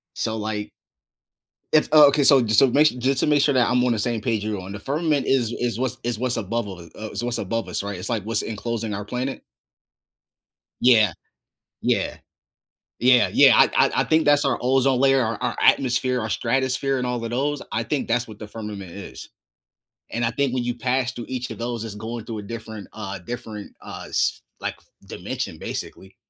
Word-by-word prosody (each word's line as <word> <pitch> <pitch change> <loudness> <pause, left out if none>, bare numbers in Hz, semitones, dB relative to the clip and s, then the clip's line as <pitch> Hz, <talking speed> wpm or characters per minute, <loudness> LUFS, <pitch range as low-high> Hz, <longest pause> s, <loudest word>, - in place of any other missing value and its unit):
So, 110 0 -2
like 105 -1 -4 1.0
It's 155 - +4
oh, 150 -1 +9
okay, 140 +1 +2
so 140 0 +7
jus 110 -3 +3
so 135 - +6
ma 140 +4 +4
just 130 -2 +1
to - - +3
make 150 -1 +4
sure 145 - +3
that 125 -2 +4
I'm 125 0 +2
on 125 -1 +2
the 110 - -2
same 115 0 -1
page 110 -4 -1
you're 105 -3 -2
on, 95 +2 -8
the 100 - -6
firmament 145 +2 0
is 125 -4 +2
is 120 -1 -2
what's 130 -2 -2
is 120 -2 -2
what's 125 0 -1
above 115 +1 -2
all 95 - -6
the 85 -2 -13
uh, 110 0 -6
is - - -5
what's 120 0 -2
above 115 0 -2
us, - - -3
right? 100 -1 -5
It's, 90 - -6
like, 115 -3 0
what's 110 0 -1
enclosing 115 0 -3
our 100 +1 -4
planet? 125 +5 -4 1.4
Yeah. 110 -7 +5 0.7
Yeah. - - 0 0.9
Yeah, 125 0 +5
yeah, - - +7
I - - +5
I - - -6
I - - +2
think 160 0 +2
that's 145 0 +4
our 135 -3 +1
ozone 130 0 +2
layer, 135 -1 +4
our 115 0 -1
our - - -1
atmosphere, 125 -1 +3
our 110 - -3
stratosphere, 130 +3 0
and 125 - -2
all 120 -1 -2
of 115 - -4
those, 145 +4 0
I 110 - 0
think 125 +5 -2
that's 120 +1 0
what 110 -2 -11
the 110 - -8
firmament 105 -4 -7
is. 100 +2 -9 0.8
And 120 0 -1
I - - +1
think 135 +2 0
when 125 -1 0
you 120 0 -2
pass 130 0 0
through 120 - -7
each 125 -1 -4
of - - -6
those, 120 -1 -4
it's 110 -2 -6
going 110 +1 -6
through 115 -2 -5
a - - -9
different 110 -1 -8
uh, 100 -2 -6
a 90 - -19
different, 110 -3 -7
uh - - -8
s - - 0 0.2
like, - - -3
f - - -26 0.2
dimension, - - -5
basically. 95 0 -7
120 Hz, 215 wpm, -23 LUFS, 110-130 Hz, 1.4 s, oh